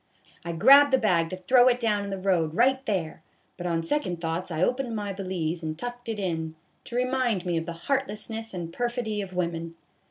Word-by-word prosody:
I 170 0 -4
grabbed 275 - +7
the 265 - +5
bag 175 -9 +2
to 185 - -5
throw 245 +7 +5
it 245 -1 +3
down 210 -4 +1
in 200 - -5
the 195 - -3
road 175 -5 +1
right 260 +4 +3
there; 170 -7 -2 0.3
but 180 -1 -5
on 165 -1 0
second 180 - -1
thoughts 165 +2 -3
I 160 0 -1
opened 250 +1 0
my 205 -2 -3
valise 180 -4 -3
and 155 -1 -4
tucked 245 +3 -6
it 225 - -2
in, 160 -5 -3 0.3
to 235 - -7
remind 250 -6 0
me 175 -1 0
of 165 0 -2
the 170 - -3
heartlessness 225 -4 -2
and 170 -3 -6
perfidy 240 -3 -2
of 190 -2 -7
women. 170 -2 -2
195 Hz, 210 wpm, -26 LUFS, 170-240 Hz, 0.3 s, grabbed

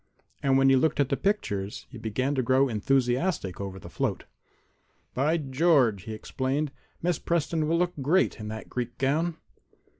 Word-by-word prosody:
And 135 -1 +3
when 135 0 +5
he 135 - +6
looked 150 +4 +2
at 140 -2 +2
the - - +2
pictures 110 - -2
he 125 - -9
began 120 +6 -1
to 135 - +1
grow 130 +2 +3
enthusiastic 125 - 0
over 95 -1 -5
the - - -10
float. - - -2 0.9
"By 150 +6 +2
George!" 135 - +2
he 110 - -5
exclaimed. 135 +6 -2 0.3
"Miss 175 0 +1
Preston 165 -2 0
will 165 +2 +2
look 175 0 +1
great 160 +3 +2
in 105 - -6
that 110 +1 -6
Greek 120 -1 -4
gown." 155 +5 0
135 Hz, 170 wpm, -27 LUFS, 120-155 Hz, 0.9 s, he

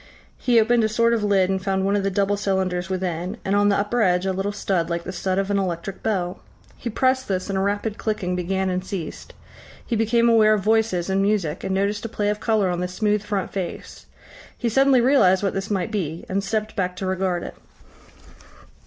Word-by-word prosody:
He 240 -2 +4
opened 230 +1 +3
a 220 - +2
sort 230 +2 +2
of 225 -2 0
lid 195 -3 +3
and 190 -1 -2
found 190 -1 0
one 200 +1 +2
of 205 - +1
the 195 - 0
double 200 +1 +1
cylinders 190 -3 -1
within, 185 +1 -3
and 195 +1 +1
on 205 0 +4
the 200 - +3
upper 210 +4 0
edge 180 -2 +2
a 190 - 0
little 195 +2 -2
stud 190 -4 -1
like 170 0 -2
the - - -5
stud 185 0 -2
of 195 +1 0
an 200 - +2
electric 185 +1 -4
bell. 180 -4 -1 0.4
He 240 - -5
pressed 260 +3 +1
this 185 0 -2
and - - -2
a 190 - +1
rapid 205 +2 -1
clicking 190 -5 -2
began 190 +1 -1
and 180 0 -2
ceased. 185 -5 -6 0.5
He 235 - -1
became 230 +2 +2
aware 215 -2 +5
of 200 - -3
voices 220 -5 +1
and 195 0 +1
music, 195 -7 0
and 190 - -1
noticed 200 +2 0
a 230 - -4
play 205 -1 -1
of 210 0 -1
colour 210 -5 +1
on 175 - -2
the 180 - -1
smooth 210 +3 0
front 205 -2 -3
face. 185 -3 -6 0.5
He 240 - -1
suddenly 270 +1 +4
realised 220 -8 +4
what 195 - 0
this 195 +1 -3
might 200 0 -1
be, 170 -6 -3
and 195 +1 -1
stepped 215 +1 -2
back 180 -2 -1
to 190 - -5
regard 185 -1 -1
it. - - -7
195 Hz, 225 wpm, -23 LUFS, 185-215 Hz, 0.5 s, aware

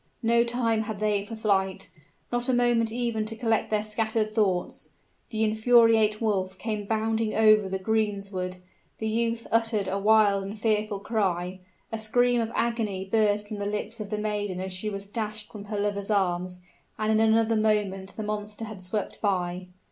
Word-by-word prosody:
No 235 +1 +4
time 235 -2 0
had 220 -1 -4
they 210 -1 +1
for 225 - -7
flight, 195 -3 0 0.4
not 240 +1 -1
a - - +3
moment 240 -2 +2
even 235 -2 -1
to 225 +1 -4
collect 225 -2 0
their 210 -1 +1
scattered 215 0 -1
thoughts. 195 -5 0 0.4
The 220 -1 -1
infuriate 220 -1 +4
wolf 190 -4 -1
came 210 -2 -4
bounding 220 0 0
over 215 -2 +5
the 190 - -1
greensward, 195 -3 -1 0.4
the 220 - -3
youth 230 +1 0
uttered 225 -3 +1
a 195 +1 -1
wild 205 -1 +4
and 200 +3 -6
fearful 210 -2 0
cry, 190 -4 -1 0.3
a 225 - -3
scream 245 +2 +2
of 225 0 -3
agony 220 -5 -1
burst 210 0 +1
from 215 - -5
the 200 0 -3
lips 210 +2 -4
of 210 -2 -5
the 210 - -2
maiden 205 -3 -2
as 190 0 -4
she 190 +4 -2
was 200 -1 -5
dashed 215 0 -5
from 205 -2 -9
her 210 0 -4
lover's 200 0 -2
arms, 180 -3 0 0.4
and 215 0 0
in 220 - +3
another 225 0 +3
moment 205 -3 0
the 220 - -4
monster 210 +1 -4
had 215 -3 -9
swept 190 +3 -4
by. 180 -3 -1
215 Hz, 180 wpm, -27 LUFS, 200-225 Hz, 0.4 s, over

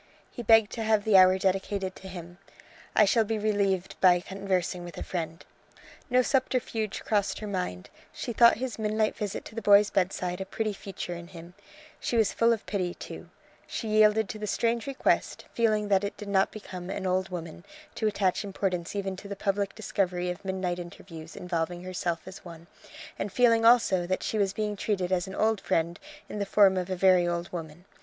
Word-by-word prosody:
He - - -7
begged 225 -2 +5
to 230 - -5
have 215 -1 +2
the 215 -1 +3
hour 185 0 +7
dedicated 190 0 -1
to 190 - -11
him. 175 -1 -9 0.6
"I 210 - +6
shall 225 +3 +3
be 220 +1 -2
relieved 200 -3 0
by 180 -2 +6
conversing 185 -1 -2
with 175 -2 -9
a - - -4
friend." 165 -2 -5 0.6
No 250 0 +4
subterfuge 245 -5 -1
crossed 205 -2 0
her 215 - -6
mind; 180 - -4 0.2
she 235 - -5
thought 235 +1 +6
his 250 -1 -4
midnight 215 0 0
visit 205 -2 -4
to - - -10
the 230 - -4
boy's 205 0 +6
bedside 180 -1 -1
a - - -3
pretty 215 0 -2
feature 195 -2 -6
in 170 0 -8
him; 175 -1 -12 0.5
she 240 - -1
was 220 -3 +3
full 230 0 +3
of 225 -3 -1
pity, 180 -2 -2
too; - - -9 0.4
she 225 - -4
yielded 215 0 +4
to 215 - -6
the 210 - -4
strange 230 +4 0
request, 275 -1 0
feeling 215 -3 +1
that 195 -1 +3
it 200 - -4
did 210 - -8
not 195 -1 +3
become 185 -4 -8
"an 190 - -4
old 185 +1 0
woman" 170 -2 -7 0.3
to 220 - -1
attach 200 -2 0
importance 190 -3 -3
even 195 -1 -2
to 200 - -10
the 200 - -5
public 200 0 -1
discovery 180 -4 -1
of 180 - -8
midnight 185 -2 -2
interviews 165 -2 -10
involving 175 0 -3
herself 175 -2 -3
as 185 +1 -10
one, 170 -2 -11 0.5
and 205 - -3
feeling 230 0 +4
also 210 -7 +5
that 185 - -1
she 220 - -1
was 195 -2 +2
being 210 +1 -2
treated 190 -3 -1
as 185 0 +1
an 190 - -7
old 220 -1 +1
friend 170 -2 0 0.3
in 210 - -6
the 200 - -1
form 195 -1 +5
of 185 0 -2
a 185 - -1
very 185 -1 +4
old 175 0 -3
woman. 165 0 -7
195 Hz, 200 wpm, -28 LUFS, 180-215 Hz, 0.6 s, hour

